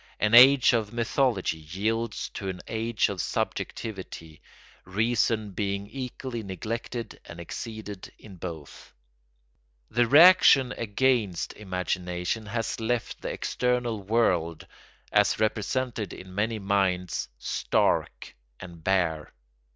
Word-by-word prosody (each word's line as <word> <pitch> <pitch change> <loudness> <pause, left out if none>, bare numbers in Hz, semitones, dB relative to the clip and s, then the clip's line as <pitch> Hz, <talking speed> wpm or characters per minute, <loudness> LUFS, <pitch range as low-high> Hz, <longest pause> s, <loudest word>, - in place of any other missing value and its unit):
An 105 +1 +1
age 130 +2 +8
of 110 -3 0
mythology 115 - 0
yields 105 +8 -3
to 95 - -5
an 90 -1 -6
age 115 0 0
of 95 -4 -3
subjectivity; 95 -7 -5 0.4
reason 110 +1 0
being 100 +1 -2
equally 125 0 -6
neglected 115 +4 -5
and 85 - -10
exceeded 105 +3 -7
in 100 -4 -13
both. 80 -5 -9 1.0
The 120 +1 +2
reaction 150 -3 +7
against 115 -5 0
imagination 90 +1 -3
has 115 +2 -3
left 115 +1 -2
the - - -4
external 125 -3 -1
world, 90 -6 0 0.5
as - - +3
represented 110 +1 -1
in 90 0 -11
many 110 +3 -1
minds, 95 -3 0
stark - - -1 0.2
and 85 -3 -11
bare. 85 -5 0
105 Hz, 105 wpm, -27 LUFS, 95-115 Hz, 1.0 s, age